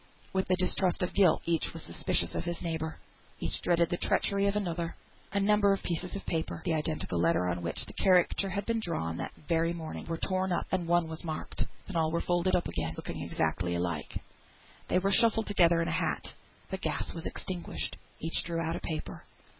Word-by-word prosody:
With 190 0 +1
the 185 - +4
distrust 185 0 +2
of 180 - -1
guilt, 190 -5 +4
each 165 -1 0
was - - -7
suspicious - - +1
of - - -1
his 170 -1 -3
neighbour; 160 -2 -2 0.4
each - - -2
dreaded 170 -1 +3
the 175 - +1
treachery 200 +2 +2
of 200 - +1
another. 170 -4 -1 0.4
A 200 - +1
number 205 0 +4
of 195 - -3
pieces 180 +2 -2
of 200 - -5
paper 160 -1 -2
(the 165 - +2
identical 155 - 0
letter 85 +2 +3
on 90 -1 -1
which 85 -1 -2
the - - -11
caricature 185 +1 +4
had 200 +2 -2
been 230 -1 +1
drawn 85 - -2
that - - -4 0.2
very 165 0 +2
morning) 160 -2 -6
were 165 0 -2
torn 185 +1 0
up, 175 - +1
and 180 -3 0
one 175 -1 +3
was 160 +1 -6
marked. 160 -2 -3 0.2
Then 195 - -7
all 160 -1 +3
were 170 - +1
folded 175 +1 +2
up 175 - +1
again, 80 -1 -3
looking - - -5
exactly 90 -1 0
alike. 85 -3 -2 0.7
They - - +2
were 195 +2 +2
shuffled 225 0 +5
together 170 -4 +4
in - - -3
a - - 0
hat. 175 +3 0 0.4
The 190 - -1
gas - - -2
was 165 - -4
extinguished; 185 -3 -4 0.2
each 165 +1 0
drew 170 -1 -2
out 165 0 -1
a - - -3
paper. 155 -2 -5
170 Hz, 210 wpm, -31 LUFS, 160-190 Hz, 0.7 s, shuffled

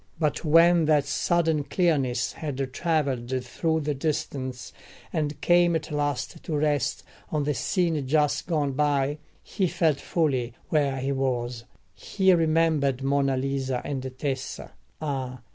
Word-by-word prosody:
But 155 -2 0
when 165 +1 +5
that 150 -2 +3
sudden 160 +1 +1
clearness 140 -6 0
had 135 -4 -4
travelled 130 -6 -1
through 160 +5 -1
the 150 0 -1
distance, 135 -3 -3 0.4
and 150 -1 -2
came 175 -1 +4
at 160 0 -3
last 145 +1 -2
to 155 - -3
rest 145 -3 0 0.3
on 150 -1 0
the 150 +1 0
scene 165 -3 0
just 150 0 +1
gone 150 -5 0
by, 145 +1 +1 0.2
he 190 - -1
felt 160 -4 +1
fully 130 -8 0
where 140 -3 +1
he 135 +1 -2
was: 125 -3 -2 0.3
he 190 -2 +2
remembered 155 -5 +2
Monna 135 -1 +1
Lisa 135 -1 -1
and 130 -2 -4
Tessa. 135 -2 -4 0.3
Ah! 130 -5 -4
145 Hz, 135 wpm, -26 LUFS, 135-160 Hz, 0.4 s, when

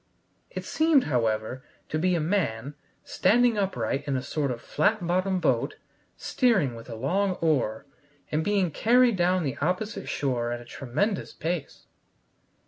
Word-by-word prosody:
It - - -6
seemed, 315 -4 +3
however, 115 -1 -1 0.3
to 155 - -1
be 180 +2 +2
a - - +1
man 150 - -1 0.3
standing 235 +5 +3
upright 185 -8 -1
in 135 -2 0
a 130 - -3
sort 145 -3 -1
of 120 -2 -3
flat 180 - 0
bottomed 185 +1 +1
boat, - - +1 0.4
steering 195 - +2
with 115 0 -11
a 115 - -5
long 185 - 0
oar, 145 -11 0 0.5
and 155 +1 +1
being 195 -3 +1
carried 240 - +4
down 180 0 +2
the 135 -4 -3
opposite 190 +6 -2
shore 120 -4 -1
at 120 - -3
a 120 - -12
tremendous 145 - -2
pace. 165 -3 -4
165 Hz, 150 wpm, -27 LUFS, 130-200 Hz, 0.5 s, carried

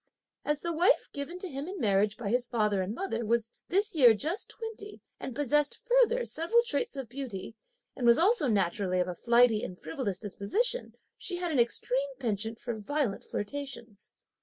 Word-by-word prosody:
As 295 0 0
the 340 0 -2
wife 345 +5 +3
given 285 +5 -4
to 375 - -5
him 280 -1 -5
in 380 +1 -6
marriage 205 0 +2
by 225 -4 -4
his 245 +2 +1
father 210 -5 +1
and 190 +4 -3
mother 270 -9 -3
was 230 0 0 0.2
this 405 +4 +1
year 250 -8 +7
just 320 - -2
twenty, 445 -2 -6 0.2
and 255 - -6
possessed 290 +1 +1
further - - +2
several 400 +9 +2
traits 475 -3 -1
of 270 -3 -5
beauty, 235 -6 -6 0.4
and 245 - 0
was 235 - +7
also 380 - +4
naturally 195 -3 +1
of 180 - +1
a 180 - -3
flighty 235 +1 +4
and 180 - -6
frivolous 215 - -3
disposition, 395 - -1 0.2
she 360 - -1
had 350 -1 -1
an 285 - +1
extreme 255 +3 +1
penchant 225 -2 -2
for 240 - -4
violent 225 +1 -2
flirtations. 240 -2 -6
255 Hz, 180 wpm, -30 LUFS, 215-340 Hz, 0.4 s, year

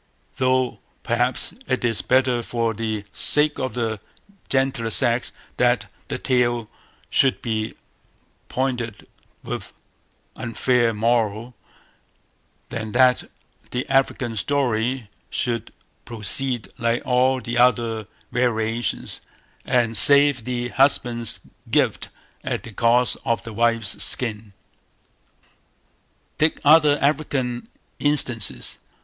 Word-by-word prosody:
Though, 130 -1 +1 0.2
perhaps, 120 +1 0
it 130 - -1
is 115 -3 0
better, 130 -1 +2
for 115 -1 -2
the 110 -1 -3
sake 150 0 +1
of 130 -2 -3
the 115 -3 -2 0.5
gentler 130 -4 0
sex, 120 +2 +2 0.3
that 120 0 +1 0.2
the - - -3
tale 120 -3 0 0.4
should 135 -2 +2
be 110 -2 -3 0.7
pointed 125 -4 -3 0.4
with - - -4
this - - -19 0.6
unfair 120 +1 +1
moral, 115 +1 0 1.2
than 110 -2 -5
that 130 -1 +3 0.4
the 125 +1 -3
African 130 -3 0
story 125 0 -1 0.2
should 120 -1 -3 0.3
proceed 120 +2 0
like 115 +1 -1
all 130 +1 +2
the 120 -1 -3
other 115 -3 +2 0.2
variations, 115 -2 -1 0.4
and 120 -2 +1
save 140 +1 +7
the 120 -1 -3
husband's 120 -4 +2 0.3
gift - - +1 0.3
at - - -3
the 115 - -10
cost 120 +3 +2
of 115 -6 -1
the 115 - -8
wife's 115 -1 +1
skin. 110 -4 +1 1.9
Take 155 +1 +2
other 150 -1 +6
African 140 -4 -1 0.3
instances. 120 - +2
120 Hz, 105 wpm, -22 LUFS, 115-130 Hz, 1.9 s, save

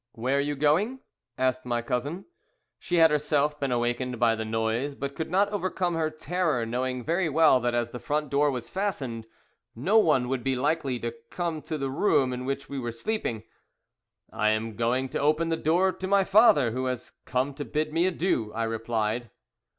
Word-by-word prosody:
"'Where 130 +4 0
are - - +3
you 145 +1 -1
going?' 165 - +2 0.4
asked 130 0 0
my 120 -1 -1
cousin. 140 +10 -3 0.5
"She 175 - -2
had 165 -2 +6
herself 150 0 +1
been 140 -2 -1
awakened 120 0 -1
by 120 -2 +4
the 110 0 -3
noise, 110 +5 -1
but 140 0 -5
could 160 - -4
not 195 +4 +2
overcome 185 -3 -1
her 160 -1 0
terror, 155 -5 -1
knowing 125 +2 -2
very 170 +3 0
well 155 -3 +5
that 120 0 -1
as 120 -1 -1
the 125 - -6
front 150 +1 -2
door 145 +1 +3
was 125 -4 -4
fastened 135 - -3 0.5
no 185 - +3
one 145 - +3
would 130 -1 -2
be 135 +1 0
likely 140 -1 0
to 115 0 -3 0.2
come 170 -3 -3
to 155 +2 -4
the 135 -2 -3
room 135 -5 +2
in 125 +1 -5
which 135 +1 -3
we 140 - -5
were 120 -2 -3
sleeping. 115 - -3 0.9
"'I 110 +1 +2
am 110 0 -1
going 120 +4 0
to - - -3
open 155 +3 +2
the 165 - +1
door 175 +4 +2
to 185 - -6
my 200 0 +4
father, 195 - +5
who 130 +3 -2
has 125 -1 -4
come 130 +3 -1
to 145 - -5
bid 155 +1 -2
me 170 +3 +3
adieu,' 165 - 0
I 115 - -1
replied. 115 0 -2
140 Hz, 195 wpm, -27 LUFS, 120-165 Hz, 0.9 s, had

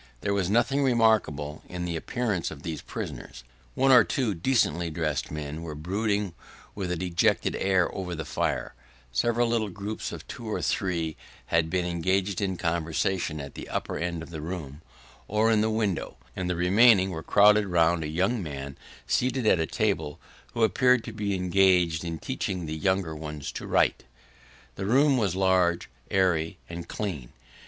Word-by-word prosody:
There 100 - 0
was 95 -3 0
nothing 120 +6 +2
remarkable 110 - +2
in 90 0 -4
the 85 -1 -3
appearance 105 +1 -2
of 75 -1 -10
these 80 -2 -4
prisoners. 60 - -7 0.3
One 135 +1 +4
or 125 -3 +8
two 125 -5 -1
decently 85 - +1
dressed 75 -4 -2
men 75 +1 -5
were 80 -2 -6
brooding 100 +4 -1 0.4
with 95 -3 -4
a - - 0
dejected 85 0 +1
air 95 -2 +2
over 90 -2 -4
the 80 -1 -5
fire; - - -2 0.4
several 120 - +1
little 115 -3 0
groups 100 +3 -5
of - - -9
two - - -8
or - - -2
three 85 -4 -1 0.4
had 85 -1 +3
been 90 +1 0
engaged 95 +3 0
in 95 -2 -1
conversation 85 -1 -1
at 70 -1 -7
the - - -8
upper - - -3
end 85 -1 -3
of 85 - -11
the 80 -2 -6
room, 80 -3 -6 0.5
or 110 +2 +2
in 110 -2 +3
the 110 - +2
windows; 110 -5 -1 0.2
and 90 -1 -3
the 90 - 0
remainder 95 +3 +5
were 80 -2 -5
crowded 105 +3 +5
round 85 -2 +2
a - - -3
young 95 +9 0
man 70 -4 -6 0.3
seated 125 - 0
at 95 - +4
a 80 - 0
table, 75 0 -1 0.4
who 115 - +1
appeared 125 +3 +4
to 115 - -7
be 105 -2 -1
engaged 90 -3 +3
in 85 -1 -4
teaching 95 -6 -3
the 80 - -4
younger 95 -1 0
ones 75 -2 -6
to - - -7
write. - - +2 0.7
The 95 - -3
room 135 +4 +4
was 100 -6 0
large, 95 -5 +2 0.2
airy, 90 -2 +1
and 85 0 -7
clean. 80 - -5
90 Hz, 175 wpm, -27 LUFS, 80-105 Hz, 0.7 s, or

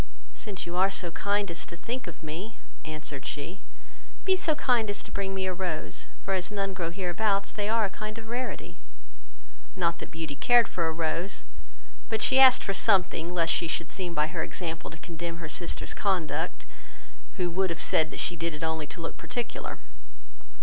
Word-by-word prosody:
"Since 205 -4 -5
you 175 0 -4
are 190 +1 +5
so 180 -3 0
kind 200 +1 +1
as 170 - 0
to 170 - -7
think 245 +8 -4
of - - -9
me, 175 +9 -5 0.3
(answered 155 -3 -5
she,) 155 +6 -4 0.7
be 380 -1 +5
so 325 -4 +2
kind 240 -6 +3
as 205 - -2
to - - -10
bring 195 -1 -1
me 190 0 0
a 185 - 0
rose, 175 -4 -2 0.2
for 195 - +1
as 185 0 0
none 195 -2 -1
grow 175 -3 -2
hereabouts, 195 +3 +1
they 205 0 -1
are 225 -1 +4
a - - -1
kind 215 +2 -5
of 225 -1 -8
rarity." 245 +3 -4 1.0
Not 170 -2 +1
that - - -6
Beauty 160 -3 -4
cared 240 - +6
for 170 -2 0
a - - +1
rose, 165 +4 -1 0.7
but 220 -2 +1
she 265 - +6
asked 260 -1 +9
for 195 - 0
something, 190 -4 +3
lest 170 -2 +3
she 170 - +2
should 165 0 -1
seem 180 -3 -3
by 150 - +4
her 155 - -2
example 165 -3 -3
to 160 - -9
condemn 170 0 -5
her 165 -2 -5
sisters' 170 +3 -1
conduct, 185 -6 0 0.7
who 180 -2 +1
would 190 +2 +2
have 170 - -3
said 155 0 +2
she 175 - +2
did 165 -1 -1
it 150 - -7
only 160 -2 0
to 170 - -6
look 165 - -4
particular. 240 -1 -4
180 Hz, 195 wpm, -29 LUFS, 165-205 Hz, 1.0 s, asked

